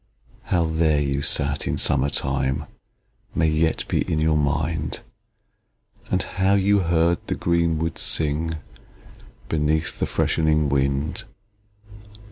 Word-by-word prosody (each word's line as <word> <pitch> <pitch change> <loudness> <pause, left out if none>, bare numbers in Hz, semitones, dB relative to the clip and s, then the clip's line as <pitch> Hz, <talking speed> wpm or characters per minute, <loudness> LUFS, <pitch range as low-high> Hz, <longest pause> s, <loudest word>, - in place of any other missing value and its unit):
How 85 -2 +1
there 80 -2 +2
you 70 -1 -1
sat 70 0 +1
in - - -1
summer 70 - +2
time, 65 +1 0 0.7
May 80 - +2
yet 80 +1 0
be - - 0
in 80 - +1
your 80 0 +2
mind; 75 +2 -1 1.1
And - - +1
how 95 +1 +1
you 100 +1 +3
heard 85 -1 +2
the - - -1
green 85 -1 +1
woods 80 +1 -2
sing 80 +1 0 0.9
Beneath 75 0 -1
the - - 0
freshening 75 -2 +1
wind. 70 +2 -1
80 Hz, 120 wpm, -23 LUFS, 70-80 Hz, 1.1 s, you